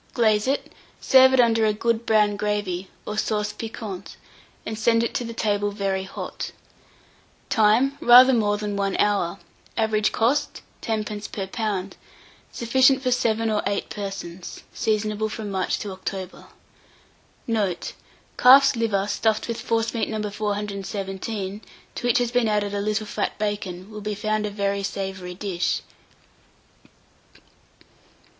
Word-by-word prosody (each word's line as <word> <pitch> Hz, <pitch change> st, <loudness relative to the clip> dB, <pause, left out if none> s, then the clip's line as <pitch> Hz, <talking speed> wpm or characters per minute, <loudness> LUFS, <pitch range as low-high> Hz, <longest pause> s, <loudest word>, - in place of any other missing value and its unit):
glaze 215 Hz, -2 st, +3 dB
it, 275 Hz, +2 st, -1 dB, 0.3 s
serve 260 Hz, 0 st, +6 dB
under 225 Hz, -2 st, +4 dB
it 215 Hz, -, +4 dB
a -, -, +1 dB
good 230 Hz, +2 st, -1 dB
brown 210 Hz, -2 st, +3 dB
gravy, 205 Hz, -3 st, -2 dB, 0.2 s
or 210 Hz, 0 st, -2 dB
sauce 210 Hz, -1 st, -1 dB
piquante, 210 Hz, -3 st, -7 dB, 0.5 s
and 220 Hz, 0 st, -4 dB
send 230 Hz, +1 st, +3 dB
it 235 Hz, -, -2 dB
to 235 Hz, -1 st, -3 dB
table 205 Hz, -2 st, 0 dB
very 195 Hz, -2 st, -2 dB
hot. -, -, -6 dB, 1.0 s
Time. 230 Hz, +5 st, +4 dB
Rather 250 Hz, +2 st, +8 dB
more 205 Hz, -3 st, +2 dB
than 205 Hz, -1 st, -3 dB
1 200 Hz, -1 st, -1 dB
hour. 200 Hz, -3 st, +1 dB, 0.4 s
Average 215 Hz, -1 st, +2 dB
cost, 250 Hz, +6 st, 0 dB, 0.2 s
10d. 215 Hz, -2 st, -3 dB
per 195 Hz, -, -3 dB
lb. 195 Hz, -2 st, -3 dB, 0.6 s
Sufficient 260 Hz, +3 st, +3 dB
for 255 Hz, -, +1 dB
7 230 Hz, -2 st, +1 dB
or 210 Hz, -, +1 dB
8 200 Hz, 0 st, -2 dB
persons. 195 Hz, -3 st, -6 dB
Seasonable 215 Hz, 0 st, 0 dB
from 215 Hz, -1 st, -5 dB
March 190 Hz, -1 st, 0 dB
to 205 Hz, -, -5 dB
October. 190 Hz, 0 st, -6 dB, 1.0 s
Note. 210 Hz, -6 st, -1 dB, 0.5 s
Calf's 270 Hz, +2 st, +8 dB
liver 215 Hz, -4 st, 0 dB
stuffed 215 Hz, +1 st, 0 dB
with 230 Hz, 0 st, -4 dB
forcemeat 230 Hz, 0 st, -1 dB
No. 215 Hz, -1 st, -2 dB
417, 200 Hz, 0 st, -4 dB, 0.3 s
to 245 Hz, -, -3 dB
which 240 Hz, -, +4 dB
has 245 Hz, -1 st, 0 dB
been 245 Hz, -2 st, +2 dB
added 205 Hz, -1 st, 0 dB
a 200 Hz, -, -1 dB
little 215 Hz, +1 st, -1 dB
fat -, -, -3 dB
bacon, 205 Hz, -2 st, -4 dB
will 215 Hz, 0 st, -7 dB
be 210 Hz, 0 st, -3 dB
found 215 Hz, +1 st, -1 dB
a -, -, -3 dB
very 200 Hz, -1 st, -1 dB
savoury 190 Hz, -2 st, -4 dB
dish. 185 Hz, -2 st, -1 dB
210 Hz, 135 wpm, -24 LUFS, 200-225 Hz, 1.0 s, Rather